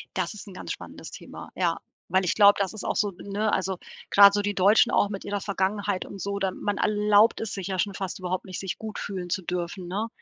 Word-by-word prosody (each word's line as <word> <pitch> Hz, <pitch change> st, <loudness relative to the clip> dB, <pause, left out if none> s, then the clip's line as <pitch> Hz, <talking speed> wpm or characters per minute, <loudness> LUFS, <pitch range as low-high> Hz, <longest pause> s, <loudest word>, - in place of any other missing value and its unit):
Das 185 Hz, -2 st, -1 dB
ist 210 Hz, 0 st, -10 dB
'n 195 Hz, -, -10 dB
ganz -, -, -6 dB
spannendes -, -, -8 dB
Thema. -, -, -10 dB
Ja, -, -, +1 dB, 0.3 s
weil 190 Hz, 0 st, +2 dB
ich 175 Hz, -, +2 dB
glaube, 205 Hz, -1 st, +8 dB
das 195 Hz, +1 st, 0 dB
ist 215 Hz, -, -7 dB
auch -, -, -1 dB
so 205 Hz, -1 st, +1 dB
ne, 205 Hz, +3 st, -2 dB
also 190 Hz, -1 st, 0 dB, 0.3 s
grade 200 Hz, 0 st, +8 dB
so 205 Hz, -, +1 dB
die 205 Hz, 0 st, -2 dB
Deutschen 210 Hz, +5 st, +5 dB
auch 205 Hz, -, +3 dB
mit 200 Hz, -2 st, -6 dB
ihrer 205 Hz, 0 st, -2 dB
Vergangenheit 200 Hz, 0 st, -1 dB
und 195 Hz, -, -9 dB
so, 200 Hz, +1 st, -2 dB
dann 190 Hz, -2 st, -1 dB
man 205 Hz, -1 st, -1 dB
erlaubt 210 Hz, +1 st, +3 dB
es 225 Hz, -, -4 dB
sich 195 Hz, -1 st, -4 dB
ja 190 Hz, -1 st, -2 dB
schon 200 Hz, +1 st, 0 dB
fast 190 Hz, -1 st, -5 dB
überhaupt 185 Hz, 0 st, -3 dB
nicht, 185 Hz, -, -6 dB
sich 190 Hz, -2 st, -4 dB
gut 220 Hz, -1 st, -7 dB
fühlen 185 Hz, -3 st, -5 dB
zu 190 Hz, -, -1 dB
dürfen, 180 Hz, +1 st, -4 dB
ne? 205 Hz, +5 st, -2 dB
200 Hz, 245 wpm, -26 LUFS, 185-205 Hz, 0.3 s, glaube